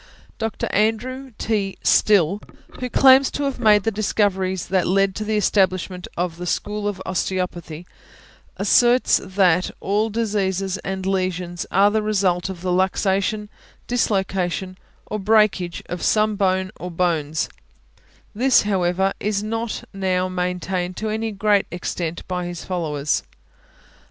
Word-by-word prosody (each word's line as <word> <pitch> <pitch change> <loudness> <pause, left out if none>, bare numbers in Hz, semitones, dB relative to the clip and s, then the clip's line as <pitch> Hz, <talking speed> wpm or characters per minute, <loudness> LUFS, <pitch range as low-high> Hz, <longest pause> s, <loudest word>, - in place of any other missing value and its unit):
Dr. 225 -1 -2
Andrew 250 +5 0
T. 205 -3 -1
Still, 200 -1 +3 0.4
who 250 0 -3
claims 265 +1 +6
to 290 - -3
have 275 -2 -2
made 210 -3 +5
the 225 - +1
discoveries 190 -3 0
that 185 -1 +1
led 195 +1 +2
to 215 - -4
the 215 0 0
establishment 185 -3 +1
of 170 -1 -2
the 180 0 -6
school 205 +4 -2
of 205 -2 -3
Osteopathy, 180 -3 -3 0.7
asserts 240 +6 +4
that 185 -2 +2
all 210 +3 0
diseases 195 -4 -1
and 190 -1 -4
lesions 185 -2 -2
are 200 +2 +4
the 220 +1 +1
result 195 -4 0
of 185 -3 -7
the 185 0 -1
luxation, 190 +3 +1 0.4
dislocation, 190 -5 -1 0.3
or 215 - -4
breakage 200 -4 +2
of 175 -1 -6
some 215 0 +2
bone 190 -1 +1
or 180 - -5
bones; 165 -3 0 0.9
this, 250 +4 +4
however, 190 -1 +1
is 205 0 -1
not 225 +1 -3
now 185 -1 0
maintained 180 0 -2
to 220 - -2
any 220 +1 -2
great 205 0 +2
extent 170 -1 -4
by 180 -1 -3
his 175 -1 -7
followers. 155 -5 -1
190 Hz, 135 wpm, -22 LUFS, 180-215 Hz, 0.9 s, claims